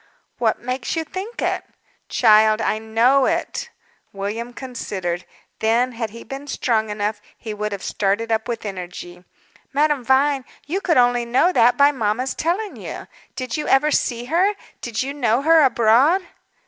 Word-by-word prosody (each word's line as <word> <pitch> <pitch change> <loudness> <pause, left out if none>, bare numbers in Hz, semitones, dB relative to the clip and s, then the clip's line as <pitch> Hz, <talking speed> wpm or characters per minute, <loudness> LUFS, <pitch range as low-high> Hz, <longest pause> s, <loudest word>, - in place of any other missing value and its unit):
"What 225 -3 +2
makes 255 +3 -3
you 325 - -1
think 380 +8 -6
it?" - - -1 0.5
"Child, 215 -1 +5
I 215 -1 0
know 235 +5 +3
it!" 335 +1 -2 0.4
William 210 +5 -4
considered. 195 -9 -5 0.3
Then, 235 +3 +2
had 230 -2 -4
he 230 +3 -11
been 275 +1 -8
strong 225 -5 0
enough, 210 0 -2 0.2
he 220 -2 -6
would 210 0 -3
have 200 -1 -5
started 205 +3 -1
up 220 0 0
with 230 -2 -4
energy. 180 -2 -7 0.5
"Madame 295 -2 +2
Vine, 270 +2 +2 0.2
you 365 +7 -2
could 335 -7 +2
only 245 -1 +4
know 250 +9 +3
that 245 -2 +4
by 285 +1 +6
mamma's 250 0 -1
telling 375 +6 -2
you! - - -7 0.3
Did 255 -1 -3
you 300 - -3
ever 295 +3 +3
see 240 -4 0
her? 365 +9 +2 0.3
Did 235 0 -2
you 275 +1 -4
know 250 -2 +1
her 325 +1 +6
abroad?" 265 - +4
245 Hz, 160 wpm, -21 LUFS, 220-280 Hz, 0.5 s, by